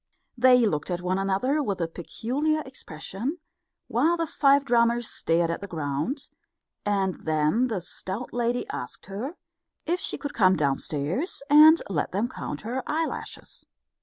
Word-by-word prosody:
They 250 -1 +6
looked 150 -6 -1
at 175 -1 -2
one 185 +1 0
another 195 +10 +1
with 200 -9 -2
a 165 - 0
peculiar 265 - -2
expression, 240 - -5 0.5
while 340 +2 +2
the 335 - 0
five 280 -2 +3
drummers 235 -1 +2
stared 165 0 +1
at 170 - -4
the 200 - -6
ground; 160 - -3 0.5
and 195 -3 0
then 155 +10 +2
the 215 -6 -2
stout 190 +6 -6
lady 240 0 0
asked 125 - -7
her 220 - -5 0.5
if 350 +3 0
she - - -2
would 285 - -3
come 190 -3 +4
downstairs 150 - -1
and 310 +2 +8
let 175 -4 -2
them 205 +5 +1
count - - -6
her 245 +4 -3
eyelashes. 320 +1 -4
225 Hz, 150 wpm, -26 LUFS, 175-275 Hz, 0.5 s, and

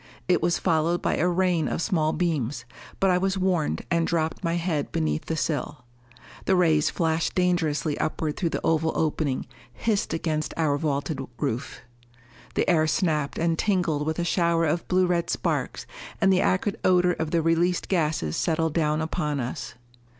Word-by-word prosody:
It 180 -1 +3
was 170 +1 +2
followed 170 0 +1
by - - 0
a 175 - +2
rain 180 -2 +1
of - - -2
small 165 -4 +1
beams, 145 -7 -1 0.3
but 195 -1 +3
I 180 - +3
was 195 +1 0
warned 185 -5 0
and 170 -1 +2
dropped 165 +1 -1
my 170 -1 0
head 165 -4 -1
beneath 75 -1 -1
the 160 - -2
sill. 150 -4 -3 0.6
The 190 - +3
rays 160 -4 +3
flashed 165 -1 0
dangerously 165 -4 +1
upward 155 -1 -1
through 170 - -1
the - - -3
oval 160 0 +1
opening, 150 -3 0 0.3
hissed 210 - -1
against 155 -1 -2
our 155 -3 +2
vaulted 145 0 -2 0.2
roof. 115 +1 -3 0.7
The - - +1
air 160 -3 +3
snapped 155 -3 0
and 165 0 0
tingled 170 -7 +1
with 160 - -1
a 175 - 0
shower 170 -1 +2
of 160 +2 -1
blue 185 0 +3
red 175 -1 0
sparks, - - -2 0.3
and 195 -2 +4
the 185 - +3
acrid 200 +3 0
odor 180 -1 +4
of 160 -2 -3
the 165 -1 +1
released 170 +2 +1
gases 155 - 0
settled 160 -1 0
down 155 -1 +1
upon 155 -3 -2
us. 125 -1 -5
165 Hz, 170 wpm, -25 LUFS, 155-180 Hz, 0.7 s, and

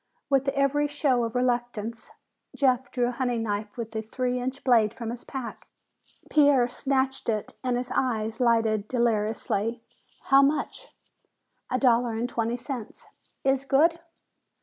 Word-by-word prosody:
With 275 0 +3
every 275 +1 +2
show 275 -5 +1
of 230 +1 -6
reluctance, 240 -3 -1 0.5
Jeff 260 -1 +2
drew 245 -1 0
a - - -2
hunting 245 -2 -1
knife 210 0 -3
with 225 -1 -6
a 220 - -1
three 250 +3 -2
inch 260 +2 -4
blade 230 -4 +3
from 230 -2 -5
his 240 0 -7
pack. 265 -3 -7 0.6
Pierre 285 -5 +4
snatched 265 0 -1
it 215 -2 -2
and 250 -1 0
his 250 0 -3
eyes 225 -2 -1
lighted 225 -3 +2
deliriously. 225 -1 0 0.4
"How 275 0 +6
much?" 300 - 0 0.8
"A 255 - +1
dollar 245 -2 +3
and 230 +2 -1
twenty 235 0 -2
cents." 245 -2 -7 0.4
"Is 270 0 +2
good!" 310 +5 +3
245 Hz, 145 wpm, -26 LUFS, 225-270 Hz, 0.8 s, How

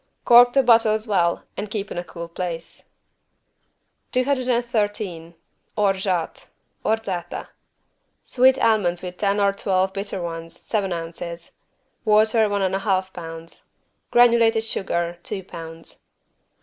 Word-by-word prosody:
Cork 245 0 +7
the 270 - +4
bottles 225 -3 +4
well 175 -6 +1
and 205 +1 -5
keep 205 -1 -4
in - - -5
a - - -4
cool 170 -1 -8
place. 170 -1 -6 1.3
213 235 -9 -1 0.4
ORGEAT 190 -4 0 0.4
(Orzata) 200 -6 -2 0.8
Sweet 260 +1 +4
almonds 205 -8 +1
with 180 0 -7
10 200 0 +1
or 200 -1 +3
12 190 -1 0
bitter 195 -1 -4
ones, 165 -1 -6
seven 200 -4 -2
ounces. 170 0 -6 0.5
Water, 215 0 +4
one 200 -1 0
and 190 0 0
half 190 -2 -1
pounds. 165 -1 -9 0.4
Granulated 230 -2 +4
sugar, 175 -5 -2
two 195 0 -5
pounds. 165 -2 -10
195 Hz, 115 wpm, -23 LUFS, 175-225 Hz, 1.3 s, Cork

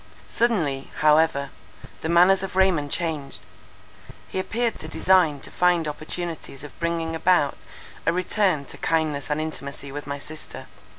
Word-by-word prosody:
Suddenly, 165 - 0
however, 150 -2 +4 0.5
the 160 - -3
manners 180 +3 +6
of 195 -1 -5
Raymond 185 -6 +3
changed; 155 -4 -2 0.8
he - - -3
appeared 230 +4 -1
to 155 - -6
desire 170 -2 +3
to 135 - -10
find 175 -3 +2
opportunities 155 -2 -5
of 145 - -11
bringing 170 -1 -1
about 160 -4 +3 0.5
a - - +6
return 180 -3 +1
to - - -12
kindness 155 -3 0
and 150 0 0
intimacy 140 -3 -5
with 145 +1 -6
my 140 0 -3
sister. 155 +2 -10
160 Hz, 140 wpm, -24 LUFS, 145-180 Hz, 0.8 s, manners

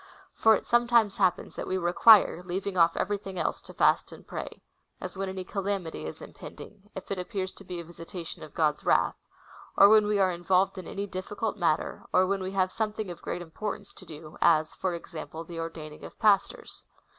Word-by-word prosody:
^ - - -23 0.3
For 220 0 +5
it - - -5
sometimes 240 -3 +3
happens, 185 -3 +1
that - - -5
we 185 - 0
require 180 +2 +6
(leaving 185 +2 -4
off 165 -1 +4
everything 195 -1 -2
else) - - -1
to - - -12
fast - - +3
and - - -13
pra?/; - - -5 0.5
as - - -6
when 195 0 -3
any 190 0 -5
calamity 195 - -3
is 80 - -8
impending, 200 +2 -12
if 190 - -8
it 195 - -2
appears 185 0 -4
to - - -14
be 180 -2 -6
a - - -6
visi 170 0 -11
tation 170 -2 -8
of 155 - -11
God's 150 -2 +1
wrath; - - +2 0.6
or 200 - +9
when 215 -1 +6
we 210 -1 +2
are 190 -2 +3
involved 185 +2 +1
in 180 - -9
any 200 +1 -4
diffi 185 +2 -6
cult 220 -2 -1
matter, 160 -3 -1
or 185 - +4
when 195 +1 -1
we 185 +1 -4
have 185 -1 +1
something 215 -2 -3
of 175 - -10
great 175 - -4
importance 195 +5 -6
to - - -13
do, 155 0 -11
as, 155 -2 +4
for 185 -2 -2
example, 165 -1 -8
the 165 0 -8
ordaining 160 -2 -7
of - - -10
jjastors. 210 -3 +1
185 Hz, 210 wpm, -28 LUFS, 170-200 Hz, 0.6 s, or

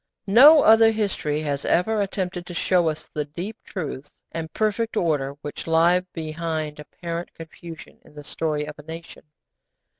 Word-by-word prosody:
No 280 +9 +8
other 225 0 +7
history 195 -9 -1
has 145 -2 -2
ever 215 +4 +1
attempted 185 -3 -3
to 175 - -8
show 175 -2 +2
us 155 - -6
the 150 - -1
deep 175 +9 -6
truths 145 -6 -6 0.2
and 160 -1 -5
perfect 220 +3 -1
order 145 -6 0
which 145 - -7
lie 165 +2 +4
behind 155 -1 -4
apparent 170 +3 -6
confusion 165 0 -11
in - - -20
the 150 - -9
story 150 0 -2
of 150 0 -9
a - - -10
nation. 165 +1 -10
165 Hz, 155 wpm, -23 LUFS, 150-190 Hz, 0.2 s, No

